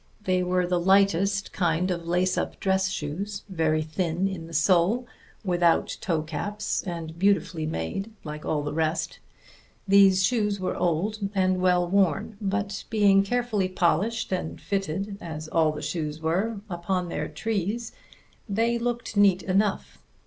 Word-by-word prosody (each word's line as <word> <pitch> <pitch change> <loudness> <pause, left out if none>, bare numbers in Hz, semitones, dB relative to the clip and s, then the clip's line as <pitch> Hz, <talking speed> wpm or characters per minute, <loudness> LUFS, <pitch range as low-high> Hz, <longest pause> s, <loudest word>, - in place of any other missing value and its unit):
They 185 -2 +1
were 180 0 +1
the 175 0 +1
lightest 195 +1 +2
kind 175 +1 +1
of 170 -1 -4
lace 180 +2 +1
up - - -3
dress 190 0 +1
shoes, 195 +5 -4
very 160 -4 +1
thin 170 +3 -1
in 175 -4 -5
the - - -12
sole, 185 +9 +3 0.4
without 175 -2 +2
toe 165 -5 0
caps, 205 +7 -3
and 170 -3 -6
beautifully 185 -4 +1
made, 155 - -3
like 150 -1 -7
all 150 -2 -1
the 150 - -3
rest. 160 +1 -1 0.7
These 195 -1 +6
shoes 210 -3 +1
were 185 - -2
old 180 +6 0 0.2
and 185 -1 +2
well 180 -1 +3
worn; 195 +3 +1
but 200 0 -2
being 205 -3 +5
carefully 215 -2 0
polished 195 +6 0
and 180 -4 -3
fitted, 195 +1 -3
as 155 -2 -6
all 160 -1 +3
the 150 0 -7
shoes 150 0 -3
were, 185 +8 0
upon 180 0 -2
their 150 -2 -3
trees, 220 +6 -2 0.6
they 230 +3 +1
looked 240 -1 -3
neat 200 -2 +4
enough. 195 +1 0
185 Hz, 150 wpm, -26 LUFS, 165-200 Hz, 0.7 s, These